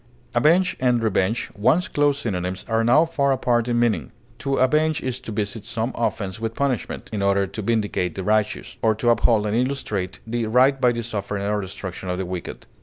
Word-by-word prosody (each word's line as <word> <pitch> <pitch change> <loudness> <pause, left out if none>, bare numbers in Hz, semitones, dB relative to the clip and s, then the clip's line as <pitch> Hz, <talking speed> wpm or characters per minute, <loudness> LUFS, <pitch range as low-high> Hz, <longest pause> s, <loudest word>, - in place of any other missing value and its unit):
Avenge 165 +9 +3
and 125 -2 +2
revenge, 110 +1 0
once 145 - +2
close 145 -1 +2
synonyms, 95 -6 -3
are 115 0 +1
now 125 +8 +5
far 140 -4 +1
apart 120 -3 +1
in 120 -1 +1
meaning. 105 - 0 0.3
To 135 0 -1
avenge 155 +4 +2
is 130 -1 -2
to 115 - -7
visit 105 +1 -3
some 115 +2 -2
offense 100 -4 -2
with 115 0 -3
punishment, 135 -5 -2
in 105 - -1
order 100 0 +2
to 110 - -6
vindicate 105 -5 -1
the 95 - -4
righteous, 105 +1 0
or 110 -1 +3
to 120 +2 +2
uphold 115 -2 +3
and 105 +1 0
illustrate 115 -7 -2
the 115 0 -2
right 130 +4 +4
by 125 -1 +5
the 120 0 -3
suffering 105 -3 -4
or 105 0 0
destruction 95 -1 -6
of 90 - -1
the 95 - -2
wicked. 90 -1 -6
115 Hz, 195 wpm, -23 LUFS, 100-125 Hz, 0.3 s, now